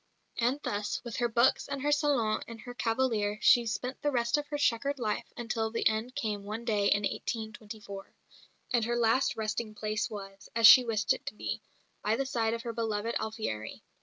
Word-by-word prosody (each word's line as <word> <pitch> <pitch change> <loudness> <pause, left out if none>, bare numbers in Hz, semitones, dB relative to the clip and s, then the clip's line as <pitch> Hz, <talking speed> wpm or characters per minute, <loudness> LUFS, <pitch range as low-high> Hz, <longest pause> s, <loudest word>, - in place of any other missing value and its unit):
And 245 +4 +1
thus, 205 0 -2
with 235 -3 -6
her 240 -1 +1
books 235 +3 +3
and 275 -1 -4
her 295 - +2
salon 280 -8 +2
and 230 -1 -9
her 245 - -8
cavalier, 225 -4 0
she 235 0 +5
spent 250 +4 -3
the 295 - +1
rest 235 -2 +1
of 295 0 -2
her 295 0 -3
chequered 280 +1 +1
life 215 -4 -2
until 225 -1 -2
the 230 - +1
end 220 +4 -1
came 210 -7 -2
one 215 +3 -5
day 210 -3 +2
in 205 +1 +3
1824; 215 -3 -5 0.6
and 240 -2 +3
her 240 +1 0
last 240 +3 +2
resting 215 0 -3
place 215 -1 -2
was, 195 -2 -9
as 230 -1 +4
she 250 +3 +11
wished 225 -3 +1
it - - -9
to - - -4
be, - - -4 0.4
by 215 +1 +2
the 270 +3 -1
side 230 -4 0
of 230 - -7
her 235 -2 -4
beloved 225 0 -2
Alfieri. 215 - -4
230 Hz, 195 wpm, -30 LUFS, 215-245 Hz, 0.6 s, she